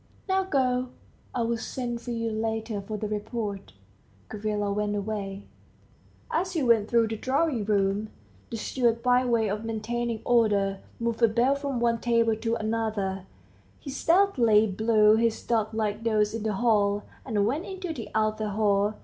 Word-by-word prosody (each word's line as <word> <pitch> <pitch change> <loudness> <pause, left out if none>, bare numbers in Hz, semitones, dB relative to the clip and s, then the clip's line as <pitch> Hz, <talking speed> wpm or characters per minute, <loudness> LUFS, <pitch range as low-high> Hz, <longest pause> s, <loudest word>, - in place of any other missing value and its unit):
Now 380 0 +1
go. 255 -6 +1 0.5
I 240 - +1
will 230 0 -1
send 240 0 -4
for 245 - -8
you 230 -1 -2
later 220 -1 -2
for 210 +2 -5
the 215 - -3
report." 205 - -4 0.6
Gavrila 210 -1 -2
went 210 0 -1
away. 200 -1 -4 0.9
As 365 +3 0
he 320 -5 0
went 230 -4 +3
through 230 -2 +3
the 220 - -2
drawing 260 -2 0
room, 200 0 +1 0.4
the 230 - -4
steward, 235 0 0
by 250 0 +4
way 230 -3 +2
of 210 +2 -3
maintaining 225 +1 -3
order, 205 -5 +2 0.2
moved 230 0 -2
a 230 - +7
bell 240 +5 +2
from 280 -3 -3
one 235 -1 +1
table 230 -1 +2
to 225 +1 -1
another; 215 -4 -2 0.5
he 275 - -7
stealthily 265 - +4
blew 215 +1 +4
his 230 -1 +1
duck 220 -2 0
like 215 -1 -2
nose 215 -2 +2
in 225 - -3
the 215 0 -1
hall, 205 -2 +2 0.2
and 210 -5 0
went 285 - -1
into 375 -3 -5
the 230 -8 -7
outer 215 0 0
hall. 205 0 +1
225 Hz, 165 wpm, -27 LUFS, 210-240 Hz, 0.9 s, a